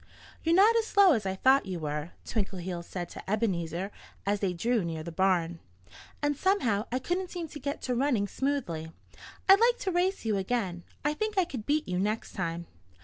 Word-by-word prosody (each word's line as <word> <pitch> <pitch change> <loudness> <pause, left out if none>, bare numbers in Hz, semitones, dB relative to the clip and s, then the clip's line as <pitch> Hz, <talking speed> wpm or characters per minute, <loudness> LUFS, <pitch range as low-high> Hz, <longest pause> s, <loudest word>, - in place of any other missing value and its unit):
"You're 330 +1 +3
not 420 +5 +6
as 450 -1 +1
slow 400 -4 +6
as 215 -6 -1
I 190 - -1
thought 260 +3 +4
you 185 -2 -3
were," 150 +1 -3 0.2
Twinkleheels 185 -5 -3
said 175 -2 -4
to - - -9
Ebenezer 190 -3 -1 0.3
as 205 +1 +1
they 195 -2 0
drew 225 +5 +1
near 165 -2 -4
the 170 - -6
barn. 175 -1 +1 0.6
"And 290 0 +2
somehow 255 - +1
I 250 - +1
couldn't 355 +7 -2
seem 345 -2 -5
to 295 - -8
get 280 +2 -4
to 250 - 0
running 245 -5 +1
smoothly. 200 - -2 0.6
I'd 390 +1 +8
like 475 +1 +4
to 380 - 0
race 365 -3 0
you 215 -2 +1
again. 190 -4 -2 0.2
I 295 - +2
think 430 +5 -3
I 375 - +4
could 255 -10 -7
beat 305 +1 +1
you 180 0 -1
next 210 +3 -1
time." 170 -3 -3
220 Hz, 200 wpm, -29 LUFS, 180-300 Hz, 0.6 s, I'd